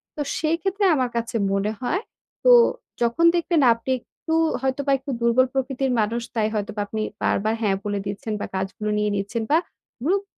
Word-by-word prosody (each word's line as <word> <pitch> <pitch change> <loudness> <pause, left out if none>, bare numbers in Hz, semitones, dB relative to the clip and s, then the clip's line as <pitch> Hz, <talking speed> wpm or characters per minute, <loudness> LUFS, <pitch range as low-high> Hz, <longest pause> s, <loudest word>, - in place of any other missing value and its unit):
তো 300 - -3 0.2
সেইক্ষেত্রে 350 +6 0
আমার 255 -3 0
কাছে 230 0 -3 0.2
মনে 195 +2 0
হয়, 340 +10 0 0.4
তো - - +6 0.5
যখন 235 +8 +2
দেখবেন 340 -2 +2
আপনি 230 +3 -5
একটু 320 +6 -7 0.3
হয়তোবা 270 +1 0
একটু 275 +1 -6
দুর্বল 235 +2 +4
প্রকৃতির 265 0 -1
মানুষ, 225 +3 0
তাই 215 -2 +2
হয়তোবা 210 0 -2
আপনি 220 +1 -3 0.2
বারবার 215 +2 +1
হ্যাঁ 200 -3 +2
বলে 205 -1 -1
দিচ্ছেন 215 +3 -4
বা, - - -3
কাজগুলো 195 +3 -3
নিয়ে 210 0 +1
নিচ্ছেন 205 +3 -2
বা, 310 - +6 0.5
গ্রুপ 390 +5 +2
235 Hz, 170 wpm, -23 LUFS, 210-285 Hz, 0.5 s, তো